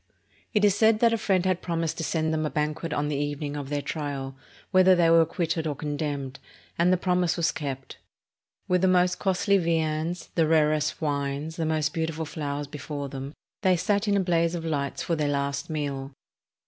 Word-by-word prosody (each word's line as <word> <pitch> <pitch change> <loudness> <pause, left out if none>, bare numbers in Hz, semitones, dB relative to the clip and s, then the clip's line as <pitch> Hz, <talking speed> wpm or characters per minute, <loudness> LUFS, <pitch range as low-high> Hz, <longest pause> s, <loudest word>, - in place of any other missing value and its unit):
It 210 -2 +3
is 205 - +5
said 220 +1 +4
that 230 -1 +5
a - - +2
friend 190 -4 +1
had 185 -1 +1
promised 165 -2 -2
to - - -2
send 160 -1 0
them 155 0 0
a 155 - 0
ban 150 0 0
quet 165 +1 -6
on 145 0 0
the 150 - -1
evening 145 0 -3
of 140 -2 -5
their 145 -1 -2
trial, 140 -3 -4 0.4
whether 185 -1 +6
they 170 -2 +4
were 165 0 +7
acquit 165 0 -1
ted 160 -1 -1
or 150 - -2
condemned, 145 -2 -4 0.4
and 175 +2 +3
the 185 - +4
promise 180 -1 +1
was 170 -1 +2
kept. 135 -3 -6 0.7
With 180 -1 +2
the 190 - +4
most 180 -1 +3
costly 195 +1 +2
viands, 165 0 -1
the 165 -2 +2
rarest 155 0 +2
wines, 145 +1 -2
the 165 -2 -1
most 155 -1 0
beautiful 160 -1 -2
flowers 145 -2 -4
before 145 0 -6
them, 135 +1 -6 0.3
they 185 -3 +3
sat 205 +4 0
in 200 -1 +3
a - - +3
blaze 170 -2 +1
of 165 -1 -5
lights 140 -3 -2
for 170 - 0
their 150 -2 0
last 140 0 -2
meal. 140 -3 -3
160 Hz, 205 wpm, -26 LUFS, 145-180 Hz, 0.7 s, were